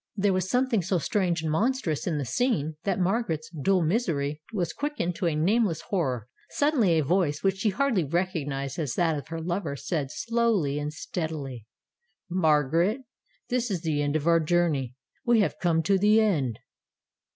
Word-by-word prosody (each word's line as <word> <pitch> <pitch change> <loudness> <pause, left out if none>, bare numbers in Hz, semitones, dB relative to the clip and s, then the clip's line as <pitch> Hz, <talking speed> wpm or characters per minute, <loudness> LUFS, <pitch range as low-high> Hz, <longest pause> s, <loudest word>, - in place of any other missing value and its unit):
There 200 -1 +2
was 185 0 -1
something 250 -4 +2
so 185 +2 0
strange 175 0 0
and 155 - -1
monstrous 200 - 0
in 165 -4 0
the 140 - -2
scene 160 - 0
that 195 -1 0
Margaret's 180 -5 -1
dull 180 +3 +1
misery 155 -6 0
was 180 -7 -2
quickened 290 - -2
to 180 - 0
a 160 - 0
nameless 185 +1 +2
horror. 130 - -1 0.2
Suddenly 250 - +2
a 155 - +2
voice, 155 -1 +1
which 195 -1 +2
she 210 +3 +1
hardly 215 -2 +1
recognized 145 -4 -2
as 145 -7 -2
that 165 -3 +2
of 145 - -6
her 165 0 -5
lover, 170 -3 -2
said 145 0 -2
slowly 220 - 0
and 150 0 -3
steadily: 150 - -5 0.6
"Margaret, 165 - +2 0.5
this 245 -1 0
is 185 -5 -2
the 155 -3 0
end 145 +1 0
of 155 -1 0
our 170 0 +5
journey; 155 -6 +1 0.3
we 240 -3 +4
have 200 - -1
come 165 -2 +2
to 195 +4 +2
the 210 +3 +5
end." 150 - +1
170 Hz, 175 wpm, -27 LUFS, 150-200 Hz, 0.6 s, our